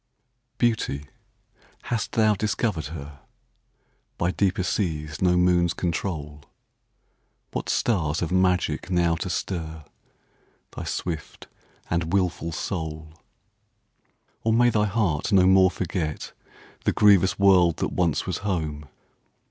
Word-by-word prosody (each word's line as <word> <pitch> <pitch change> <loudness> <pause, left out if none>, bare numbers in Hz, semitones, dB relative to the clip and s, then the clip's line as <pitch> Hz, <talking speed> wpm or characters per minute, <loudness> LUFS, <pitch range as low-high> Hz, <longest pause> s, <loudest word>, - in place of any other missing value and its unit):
Beauty—hast 110 - -4
thou 110 -1 +4
discovered 105 -5 -1 1.3
herBy 90 +2 0
deeper 95 -2 +1
seas 75 -6 -2
no 90 -1 +3
moons 90 -1 +3
control? 75 -5 -3 1.1
What - - -4
stars 80 -10 0
have 85 -1 -2
magic 90 -3 +1
now 85 -2 +2
to 95 +4 -4
stirThy 80 -4 -8
swift 80 -4 -5 0.4
and 85 -1 -1
wilful 90 -4 0
soul? 80 -2 -5 1.3
Or 115 - +2
may 120 +1 +4
thy 105 -1 +2
heart 100 -5 0
no 95 -2 +5
more 95 0 +6
forgetThe 85 -3 -3 0.6
grievous 95 -3 +5
world 90 -4 +5
that - - -1
once 85 -4 +1
was - - -3
home. 80 -7 -3
90 Hz, 100 wpm, -25 LUFS, 80-100 Hz, 1.3 s, more